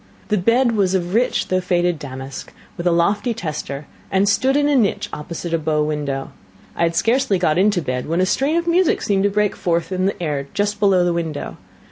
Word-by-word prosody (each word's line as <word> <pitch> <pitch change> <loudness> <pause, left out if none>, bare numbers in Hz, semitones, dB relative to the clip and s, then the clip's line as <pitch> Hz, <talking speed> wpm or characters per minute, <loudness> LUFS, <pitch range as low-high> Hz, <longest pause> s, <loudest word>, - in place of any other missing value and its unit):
The 210 - +2
bed 235 +6 +3
was 195 -4 +1
of 175 -1 -2
rich 240 +3 +1
though 185 0 +1
faded 175 -2 0
damask, 135 -1 -8 0.2
with 175 -3 -2
a - - +4
lofty 205 +7 +1
tester, 150 -4 -5 0.2
and 195 +1 +2
stood 260 +7 +2
in 290 0 +2
a 290 - +2
niche 225 -7 +1
opposite 170 +2 -5
a 165 - +2
bow 150 -1 0
window. 145 -3 -3 0.4
I - - -4
had 170 0 +2
scarcely 240 +2 +2
got 175 -2 +1
into 195 -3 +2
bed 125 -2 -3
when 165 +3 0
a 185 - +3
strain 275 - +1
of 340 - 0
music 345 0 +2
seemed 195 -1 +1
to - - +4
break 210 0 0
forth 170 0 -1
in 185 0 0
the 200 - -3
air 145 -5 -2
just 205 0 0
below 195 -3 +4
the 175 - +1
window. 165 -3 -4
180 Hz, 215 wpm, -20 LUFS, 160-210 Hz, 0.4 s, a